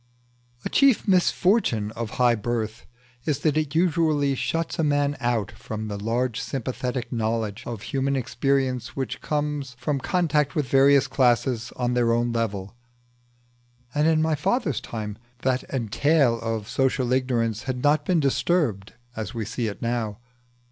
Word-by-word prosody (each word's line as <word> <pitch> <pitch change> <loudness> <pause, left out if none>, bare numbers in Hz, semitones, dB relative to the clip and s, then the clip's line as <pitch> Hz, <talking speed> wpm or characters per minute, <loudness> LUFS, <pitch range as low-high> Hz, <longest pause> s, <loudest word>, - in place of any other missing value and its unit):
A - - -1
chief 275 -6 +4
misfortune 180 - +2
of 115 -1 -4
high 125 -1 +5
birth 115 0 -3 0.4
is 150 -4 +1
that 155 -2 +2
it 155 -1 -1
usually 160 -4 +2
shuts 165 +6 -2
a - - +3
man 145 -1 +2
out 120 -4 0
from 110 0 -6
the 100 -1 -4
large 115 +1 0
sympathetic 125 -1 -3
knowledge 110 -2 -1
of 115 -3 -5
human 140 0 -1
experience 130 -1 -1
which 135 -1 -4
comes 145 -3 -2
from 135 +3 -1
contact 150 -2 +1
with 150 -4 0
various 135 +1 +5
classes 120 -2 +1
on 125 -1 -1
their 120 -1 +2
own 120 +1 +1
level, 105 -3 -2 1.2
and 150 +1 +2
in 160 -1 +3
my 160 0 +1
father's 150 - 0
time 105 -2 -6 0.2
that 130 -1 +1
entail 130 +1 +2
of 115 -2 -3
social 130 -2 +1
ignorance 120 -4 0
had 125 -1 -2
not 145 0 +3
been 175 +1 +2
disturbed 140 - 0 0.2
as 110 +2 -5
we 115 -2 -2
see 115 +2 -2
it 105 - -6
now. 115 -3 -1
125 Hz, 150 wpm, -25 LUFS, 115-145 Hz, 1.2 s, high